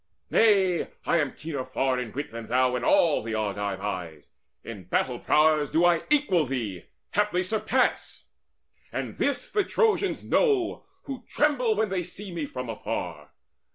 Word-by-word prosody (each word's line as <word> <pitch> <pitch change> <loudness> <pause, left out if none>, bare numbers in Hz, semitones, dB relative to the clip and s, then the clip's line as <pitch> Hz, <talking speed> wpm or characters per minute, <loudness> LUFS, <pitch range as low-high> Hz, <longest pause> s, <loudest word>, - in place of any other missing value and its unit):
Nay, 195 -5 +4 0.2
I - - +3
am 145 -4 0
keener 150 -4 -4
far 130 0 0
Of 120 -3 -6
wit 145 +2 -4
than 115 -1 -7
thou 125 +1 +2
in 125 - -2
all 160 +3 +4
the 110 0 -4
Argives' 100 -2 -2
eyes. 85 -7 -5 0.3
In - - -8
battle - - 0
prowess 150 -1 +3
do 165 +2 +3
I 175 -1 +3
equal 235 - +3
thee 115 -9 -4 0.3
Haply 205 -3 +1
surpass; 215 +4 0 0.7
and - - -5
this - - -1
the 415 - +2
Trojans 420 -1 +1
know, 410 -8 +1 0.2
Who 270 -2 -7
tremble 255 -7 +2
when 215 0 0
they 185 -1 -1
see 185 +3 -8
me 160 -4 -3
from 125 -2 -6
afar. 115 - -5
155 Hz, 155 wpm, -26 LUFS, 125-210 Hz, 0.7 s, Nay